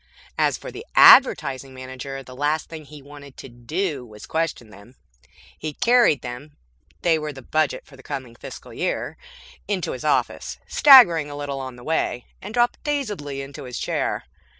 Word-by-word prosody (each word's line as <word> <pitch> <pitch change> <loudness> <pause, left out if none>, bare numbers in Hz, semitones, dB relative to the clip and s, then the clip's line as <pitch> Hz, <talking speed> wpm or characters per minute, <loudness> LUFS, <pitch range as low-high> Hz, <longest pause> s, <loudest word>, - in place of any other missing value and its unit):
As - - +1
for - - -9
the - - -9
Advertising 140 - +6
Manager, 130 +1 -7
the 130 0 -12
last 150 +3 -1
thing 160 -2 -9
he 150 -1 -13
wanted 140 -1 -13
to - - -9
do 140 +5 -4
was 105 -3 -12
question 160 -9 -3
them. 110 +5 -16 0.6
He 155 -1 -6
carried 235 - +3
them 130 +5 -8 0.5
(they 165 -2 +3
were 150 0 -4
the 135 -2 -12
budget 155 +5 -1
for 140 - -17
the 135 - -15
coming 130 -3 -7
fiscal - - -11
year) - - -3 0.5
into 195 -3 -2
his - - -7
office, - - -1
staggering 185 - +7
a 145 - -7
little 140 -1 -4
on 130 -2 -7
the 120 - -14
way, 140 -5 -1 0.2
and 205 - -8
dropped 240 +1 0
dazedly 205 - -3
into 140 +1 -10
his 125 -1 -6
chair. - - -2
145 Hz, 175 wpm, -23 LUFS, 130-165 Hz, 0.6 s, staggering